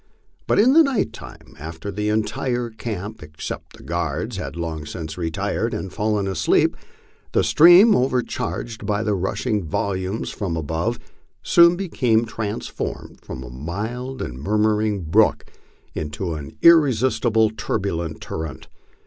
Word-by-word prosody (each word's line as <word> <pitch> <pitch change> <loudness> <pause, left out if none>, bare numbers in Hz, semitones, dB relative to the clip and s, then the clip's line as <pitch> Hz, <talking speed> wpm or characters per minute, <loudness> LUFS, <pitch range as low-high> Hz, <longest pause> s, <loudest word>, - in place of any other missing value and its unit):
But - - +2
in 245 +6 +6
the 325 - +8
night 270 -9 +1
time, - - -12
after 80 +5 -6
the 105 +2 -2
entire 120 +3 -1
camp 110 -2 -6
except 75 0 -8
the - - -15
guards 85 +3 -3
had - - -5
long 80 -2 -4
since 80 -2 -6
retired 85 -3 -2
and 95 - -5
fallen 105 -2 0
asleep, 85 -5 +2 0.6
the - - +3
stream, 175 +7 +7
overcharged 125 -2 -2
by 105 0 0
the 105 -1 0
rushing 100 +3 -1
volumes 95 +5 -2
from 90 -5 -3
above, 80 +9 -2 0.5
soon 170 0 +6
became 125 -11 +1
transformed 110 -2 -5
from 65 - -7
a - - -9
mild 110 - -5
and 60 +2 -7
murmuring 105 +2 +1
brook 80 -1 +2 0.5
into 80 +3 -4
an 70 -3 -8
irresisti 130 -7 +5
ble, 110 -1 +3
turbulent 95 -6 -3
torrent. 80 -5 -6
105 Hz, 135 wpm, -22 LUFS, 85-120 Hz, 0.6 s, the